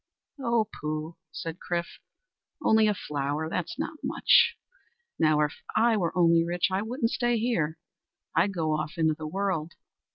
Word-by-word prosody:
"O 235 -4 +2
pooh!" 155 +2 -4 0.2
said 165 0 -6
Chrif, 170 -1 -3 0.6
"only 220 0 +5
a 210 - +3
flower! 145 0 -2
That's 170 +1 -3
not 310 - -4
much. - - +4 0.6
Now 155 -1 +4
if 150 0 +1 0.2
I 230 0 +4
were 180 -4 -1
only 170 -1 +5
rich, 175 +2 0
I 190 +1 +1
wouldn't 230 +2 -1
stay 240 -1 +1
here. 175 -10 0 0.6
I'd 175 +5 +3
go 165 -4 -1
off 155 0 -2
into 160 -1 +3
the 155 0 -6
world. 180 -3 -2
170 Hz, 155 wpm, -28 LUFS, 155-215 Hz, 0.6 s, only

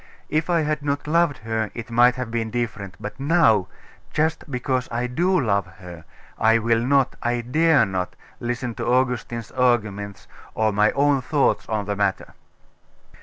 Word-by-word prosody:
If 155 +3 0
I 170 -2 +3
had 150 0 -1
not 145 0 -2
loved 160 -2 +2
her 110 -1 -1
it 115 0 -7
might 120 +2 +5
have 125 -3 -5
been 115 -1 -2
different: 110 -5 -4
but 105 +3 -7
now 135 - +3 0.4
just 160 0 -1
because 130 -1 -1
I 120 +1 -1
do 175 +9 +1
love 100 - +1
her, 85 -4 -11 0.3
I 115 +1 +4
will 115 0 +2
not, 135 +1 +2
I 120 0 0
dare 145 +1 +3
not, 95 -2 -3 0.2
listen 120 0 -3
to - - -2
Augustine's 120 -2 0
arguments, 105 -6 0 0.3
or 110 -1 +1
my 105 +1 +4
own 140 -1 +2
thoughts 145 +2 0
on 105 -2 -1
the 100 0 -2
matter. 100 -2 -1
120 Hz, 165 wpm, -23 LUFS, 110-140 Hz, 0.4 s, might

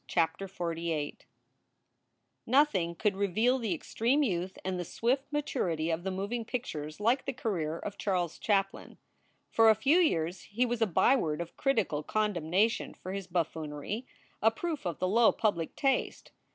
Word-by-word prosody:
CHAPTER 165 +3 0
XLVIII 165 -4 -3 1.3
NOTHING 225 - +3
could 205 +3 +1
reveal 215 +7 +2
the 215 -7 -1
extreme 245 - +1
youth 185 -5 -2
and 185 -1 -1
the - - -1
swift 255 - -1
maturity 185 - -1
of 165 +1 -2
the 190 - -1
moving 200 +5 -3
pictures 155 - -5
like 235 +5 +2
the 270 - -2
career 170 -10 -2
of 205 +3 -7
Charles 180 -5 -1
Chaplin. 195 -2 -1 0.5
For 225 -1 +6
a 220 - +6
few 295 +10 +4
years 175 - +1
he 235 +5 0
was 240 -1 -2
a 225 - +4
byword 170 - +2
of 170 -1 -6
critical 220 - +1
condemnation 205 +2 0
for 185 - -7
his 195 -2 -5
buffoonery, 165 - -3 0.3
a 225 - +6
proof 300 - -4
of 170 - -3
the 185 - 0
low 225 +4 +5
public 200 -8 -1
taste. 270 -2 0
195 Hz, 155 wpm, -30 LUFS, 170-235 Hz, 1.3 s, For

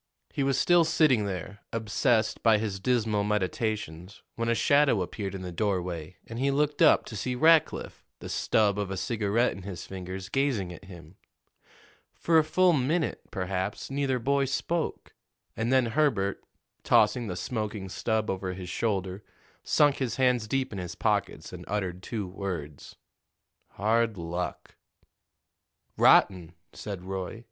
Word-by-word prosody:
He - - -2
was 135 0 +1
still 175 -1 +5
sitting 140 -9 +3
there, 100 +1 -5
obsessed 115 +1 +1
by 115 -2 +5
his 105 -2 -3
dismal 110 -2 +1
meditations, 100 -3 -3
when 115 0 -2
a 115 - +2
shadow 140 -7 +3
appeared 100 +1 -5
in 95 - -6
the 90 - -5
doorway, 90 -3 -2
and 115 +1 -7
he 135 +2 +2
looked 145 +2 0
up 160 - +6
to 110 - -8
see 125 +4 -2
Rackliff, 160 +3 +3
the - - -9
stub 105 -2 +1
of 100 -2 -2
a 95 - -4
cigarette 110 +3 +1
in 95 - -8
his 90 -3 -7
fingers, 95 0 -7
gazing 115 -9 0
at 95 - -13
him. 85 -2 -13 1.0
For 165 -1 +3
a - - +3
full 180 +3 +3
minute, 150 +4 0
perhaps, 95 +5 -3
neither 135 -2 0
boy 140 +3 +1
spoke; 160 +5 -3 0.4
and 115 +2 -1
then 130 -1 +4
Herbert, 115 -6 0 0.4
tossing 120 -2 +3
the 90 - -4
smoking 105 0 -4
stub 110 +3 -1
over 95 -2 -3
his 90 -1 -7
shoulder, 95 -2 -2 0.4
sunk 145 -2 +3
his 125 -4 -2
hands 125 -4 +2
deep 130 0 -1
in 100 - -5
his 90 -1 -6
pockets - - -1
and - - -8
uttered 95 -3 -3
two 105 -1 -4
words: 90 -6 -6 0.8
"Hard 115 +1 +1
luck." 85 +1 -5 1.2
"Rotten," 90 -3 +4 0.2
said 100 -4 -6
Roy. 95 +3 -5
105 Hz, 150 wpm, -28 LUFS, 95-130 Hz, 1.2 s, up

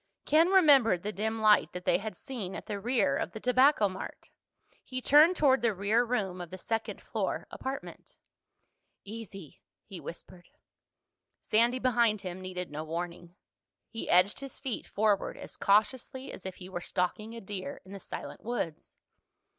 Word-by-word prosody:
Ken 320 +3 +5
remembered 280 - +5
the 210 - -2
dim 220 +3 -2
light 215 -1 +4
that 180 0 -7
they - - +3
had 215 +2 -6
seen 220 -10 -5
at - - -7
the 205 -2 -4
rear 215 - +1
of 175 - -3
the 220 - -6
Tobacco 250 -1 +4
Mart. 190 0 -8 0.5
He 255 -1 -5
turned 300 +7 +6
toward 270 -5 +4
the 230 -3 +1
rear 205 +5 +2
room 200 -7 -2
of 175 - -7
the 185 - -7
second 225 +4 -3
floor - - -3
apartment. 270 +1 -7 0.9
"Easy," 200 -6 -9 0.2
he 195 -4 -8
whispered. 175 +1 -10 0.9
Sandy, 235 +3 +2
behind 235 -4 +2
him, 185 0 -6
needed 180 -2 -5
no 150 +1 -4
warning. 170 +2 -6 0.6
He 225 - -5
edged 180 +3 +4
his 275 -1 -8
feet 265 -4 -4
forward 210 -1 +1
as - - -9
cautiously 255 +6 +1
as 190 - -8
if 190 - -7
he 180 - -10
were 180 -2 -5
stalking 210 +6 -2
a - - -6
deer 195 -2 -6
in 190 - -13
the 200 - -7
silent - - -8
woods. 215 -9 -4
210 Hz, 165 wpm, -30 LUFS, 185-245 Hz, 0.9 s, turned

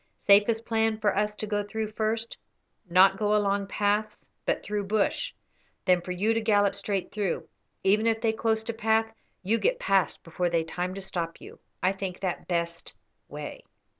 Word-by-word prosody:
Safest 215 +3 +5
plan 225 -1 +1
for 210 -2 +1
us 210 +1 0
to 215 - -4
go 205 -1 0
through 215 +1 -4
first, 220 +1 -2 0.5
not 190 +2 +6
go 210 0 +2
along 200 -1 +1
paths, 210 +1 -1 0.2
but - - 0
through 205 -1 -2
bush; 210 0 +1 0.5
then 180 -2 +4
for 180 - -10
you 205 +5 +1
to 225 - 0
gallop 205 -2 +3
straight 200 -1 -2
through; 205 -4 -2 0.4
even 210 +4 +3
if 225 -1 +2
they 225 -1 +1
close 220 0 0
to 230 - -3
path, 225 0 +1 0.3
you 220 +5 +2
get - - +2
past 195 - +1
before 175 +1 -1
they 170 -1 +1
time 180 +3 -4
to 195 - -6
stop 170 -3 -4
you. - - -12 0.2
I 185 - +4
think 190 -2 -5
that 185 -3 -3
best 170 -1 -3 0.3
way." - - -7
205 Hz, 180 wpm, -27 LUFS, 190-220 Hz, 0.5 s, not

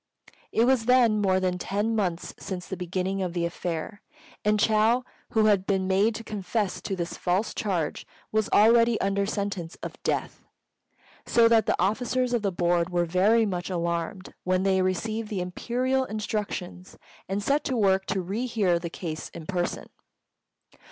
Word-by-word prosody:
It 225 - +3
was 255 -3 +3
then 240 -4 +4
more 190 -2 +3
than 180 -1 -1
ten 210 +5 -1
months 180 -5 -2
since 180 -2 -5
the 190 - -4
beginning 185 +2 -2
of 180 -2 -2
the 170 -1 0
affair, 170 +3 -4 0.4
and 210 0 +2
Chou, 220 +4 +3 0.3
who 220 -1 +4
had 200 -3 +3
been 190 -2 +1
made 200 +4 +2
to 230 - -6
confess 210 -1 -2
to 195 - -3
this 170 -1 -4
false 185 +5 0
charge, 175 -8 -2 0.2
was 215 -1 +1
already 230 +2 +5
under 200 0 0
sentence 200 -5 -3
of - - -7
death; - - -2 0.8
so 230 -1 +5
that 225 -1 +4
the - - +1
officers 245 +6 0
of 240 - +1
the 200 -2 0
Board 175 -1 +1
were 175 -1 +1
very 200 +7 +3
much 180 -3 -3
alarmed 170 +1 -3
when 185 0 +1
they 190 -1 +3
received 215 +4 -1
the 205 -4 -2
Imperial 250 +8 -1
instructions, 205 -4 -4 0.3
and 200 +1 -1
set 280 +6 +1
to 260 - -1
work 190 -3 +2
to 195 0 0
re 210 +8 -2
hear 195 -7 +1
the 170 0 -5
case 160 -2 -6
in 165 - -8
person. 175 0 -2
195 Hz, 170 wpm, -26 LUFS, 180-220 Hz, 0.8 s, already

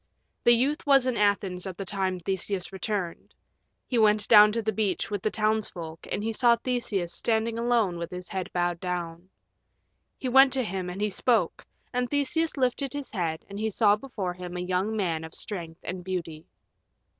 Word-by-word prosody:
The 240 - +8
youth 280 +6 0
was 275 -2 +5
in 255 -2 0
Athens 200 -3 +1
at 185 -2 -6
the 195 - -5
time 190 -1 -1
Theseus 190 +1 -2
returned. 190 -3 -4 0.5
He 245 - 0
went 210 -1 +4
down 210 -1 +8
to 230 - 0
the 220 - +1
beach 200 -1 -1
with 205 -2 -2
the 215 - +1
townsfolk, 210 -7 -2
and 205 - -2
he 225 - -1
saw 235 +1 +5
Theseus 230 -8 -2
standing 225 0 0
alone 230 -7 +1
with 170 - -4
his 180 -1 -7
head 190 -2 -4
bowed 175 -1 0
down. 175 0 -4 0.9
He 260 - -4
went 265 +1 +6
to 265 -1 +1
him 185 -3 -3
and 185 +3 -6
he 210 0 0
spoke, 215 -4 +1 0.3
and 250 0 0
Theseus 295 +3 0
lifted 265 +1 0
his 285 -1 -5
head 165 -6 -2
and 200 0 -7
he 220 +1 0
saw 210 -1 +4
before 210 -6 -4
him 180 0 -7
a - - -3
young 185 +4 -1
man 165 -5 -1
of 160 +1 -8
strength 170 -6 -5
and 180 0 -5
beauty. 170 -4 -5
205 Hz, 190 wpm, -27 LUFS, 180-230 Hz, 0.9 s, The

